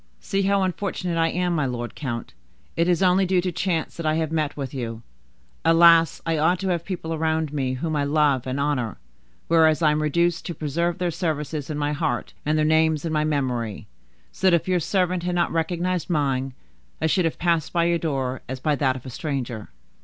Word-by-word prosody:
"See 195 - -1
how 195 0 +2
unfortunate 180 -2 -2
I 165 - +3
am, 180 +1 0
my 150 -5 +1
lord 120 -2 -4
count; 120 -5 -5 0.4
it 170 +2 +2
is 180 +2 +2
only 185 +1 +4
due 185 0 +3
to 180 0 -1
chance 170 -1 -2
that 170 - -6
I 155 - +2
have 160 -1 -1
met 155 -3 -1
with 135 -2 -5
you. 115 -3 -5 0.6
Alas! 165 0 +5
I 165 -2 0
ought 175 +4 +3
to 190 - -1
have 170 -2 0
people 170 -4 -4
around 160 -1 -1
me 130 -3 -1
whom 155 +4 -2
I 145 - +1
love 140 -3 +2
and 130 +2 -2
honor, 140 -6 -1 0.5
whereas 160 -1 +4
I 155 - +5
am 150 +1 0
reduced 170 +3 +1
to 170 - -4
preserve 170 +3 -1
their 180 -2 -1
services 150 -3 -3
in 150 - -3
my 145 0 0
heart, 155 +1 -2
and 155 +1 +2
their 155 - +2
names 160 0 +2
in 160 - -2
my 150 0 +2
memory: 125 -9 -2 0.5
so 190 - +2
that 175 - +5
if 170 - -1
your 185 -1 +2
servant 180 +1 0
had 175 0 -2
not 175 -1 +1
recognized 175 +2 -1
mine, 135 -5 0 0.4
I - - -1
should 175 +3 +2
have 165 - -1
passed 170 -3 0
by 170 -1 +2
your 170 0 +2
door 135 -5 -2
as 130 0 -4
by 150 +3 +1
that 130 -2 +1
of 130 - -9
a 130 - -7
stranger." 125 -6 -4
160 Hz, 215 wpm, -24 LUFS, 140-170 Hz, 0.6 s, Alas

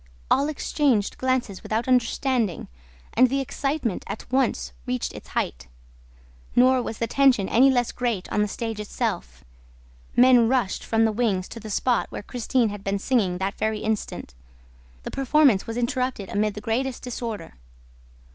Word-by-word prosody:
All 280 +3 +3
exchanged 275 -7 0
glances 255 -7 -1
without 225 +3 -2
understanding, 250 - +1 0.5
and 255 +2 +5
the 275 +2 0
excitement 275 - -2
at 200 - -6
once 260 -2 0
reached 250 -1 -2
its - - -10
height. - - -3 0.9
Nor 255 +1 +5
was 225 - -5
the 230 - 0
tension 255 -6 +3
any 260 +4 +5
less 245 -3 +1
great 235 -7 -2
on 210 - +1
the 210 - +2
stage 225 +1 -4
itself. 65 - -3 0.7
Men 245 -2 +6
rushed 245 -6 0
from 225 0 +2
the 220 - +2
wings 205 -5 0
to 230 - -8
the 220 0 -9
spot 240 +3 +1
where - - -6
Christine 245 0 0
had 205 -1 -7
been 200 0 0
singing 200 -5 +1
that 190 +2 -3
very 220 -1 -1
instant. 215 - -3 0.7
The - - -6
performance 270 -5 +3
was 225 +1 -4
interrupted 245 -4 -1
amid 210 0 0
the 210 - -6
greatest 245 +4 -2
disorder. 235 -3 -5
235 Hz, 155 wpm, -24 LUFS, 210-255 Hz, 0.9 s, Men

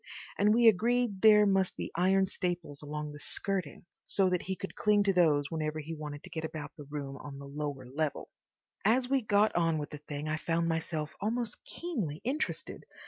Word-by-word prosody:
And 210 +1 +5
we 235 0 +6
agreed 225 0 +3
there 210 -1 +8
must 195 -2 +2
be - - -4
iron 190 +3 +4
staples 175 -6 -3
along 150 0 -5
the 145 - -10
skirting, 185 -2 -2 0.2
so 190 -2 +2
that 180 - +1
he 190 - -3
could 195 - -6
cling 210 -1 +3
to 200 -1 +2
those 150 -6 +3
whenever 155 -1 -2
he 155 +1 -5
wanted 150 -2 -7
to - - -11
get 160 - -4
about 155 -2 -5
the 145 - -10
room 140 -1 -5
on 140 -1 -8
the 140 - -9
lower 140 -2 -4
level. 145 +3 -3 0.5
As 245 +5 +3
we 270 -1 +3
got 210 -1 +3
on 165 -2 +2
with 150 -1 -4
the 150 - -7
thing 145 0 -6
I 155 0 0
found 165 +1 0
myself 160 -2 -2
almost 225 +2 -2
keenly 215 - -3
interested. 275 +6 -3
165 Hz, 195 wpm, -31 LUFS, 150-205 Hz, 0.5 s, there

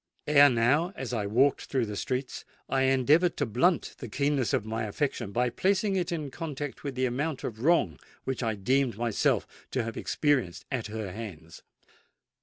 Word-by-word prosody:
Ere 145 -1 +7
now, 135 +9 +2
as 130 -2 -5
I 105 -4 -1
walked 130 +7 +2
through 130 -4 0
the 105 -1 -5
streets, 130 +5 -3 0.2
I 135 0 +1
endeavoured 145 +7 +3
to 145 - +1
blunt 160 - +1
the 120 - -7
keenness 140 0 0
of 110 - 0
my 110 +1 -2
affection 120 -1 -2
by 120 +3 +1
placing 195 - +1
it 180 -2 -1
in 155 -5 -3
contact 145 -3 -5
with 140 -3 -4
the 130 0 +1
amount 135 +4 -2
of 110 -1 -5
wrong 120 - +2 0.2
which 130 0 -3
I 115 -3 0
deemed 125 +3 +1
myself 115 -2 +1 0.2
to 125 - -1
have 115 0 -5
experienced 130 - 0
at 125 -5 -2
her 105 -3 -5
hands. 90 -6 -9
130 Hz, 180 wpm, -28 LUFS, 110-145 Hz, 0.2 s, Ere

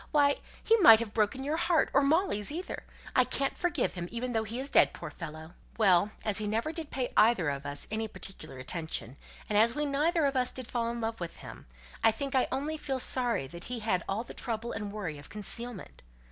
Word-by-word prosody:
Why, 285 -2 +3 0.3
he 450 - +5
might 225 - +9
have 225 -2 -5
broken 225 +5 0
your 300 +3 -1
heart, 340 -1 +2
or 280 - +5
Molly's 290 - +2
either. 350 +5 -5 0.3
I - - +6
can't 275 0 -1
forgive 345 -7 0
him, 175 -1 -5
even 245 +2 -3
though 225 -2 0
he 230 +4 -4
is 275 +2 -2
dead, - - +5
poor - - -7
fellow!" 160 0 -8 0.2
"Well, 195 -3 +4 0.2
as 210 -2 +3
he 210 - -2
never 225 +8 -1
did 325 -2 -6
pay 255 -2 -3
either 210 -7 +4
of 140 +1 -5
us 145 0 -5
any 220 0 -1
particular 185 -9 -8
attention, 140 -2 -3 0.3
and 210 -1 +2
as 230 +3 +4
we 295 0 0
neither 300 +3 +1
of 275 -1 0
us 250 -1 +2
did 255 - -5
fall 235 -1 -1
in 235 0 -4
love 225 0 -3
with 170 -2 -5
him, - - -11 0.4
I - - +7
think 270 +5 -4
I 260 - +3
only 290 +4 -2
feel 270 -3 -3
sorry 245 - +2
that 170 +3 -9
he 250 - -4
had 185 -5 0
all 200 +4 -1
the - - -10
trouble 230 -1 -3
and 210 -2 -4
worry 180 -8 -5
of 145 - -13
concealment." 225 +1 -3
230 Hz, 225 wpm, -30 LUFS, 200-275 Hz, 0.4 s, might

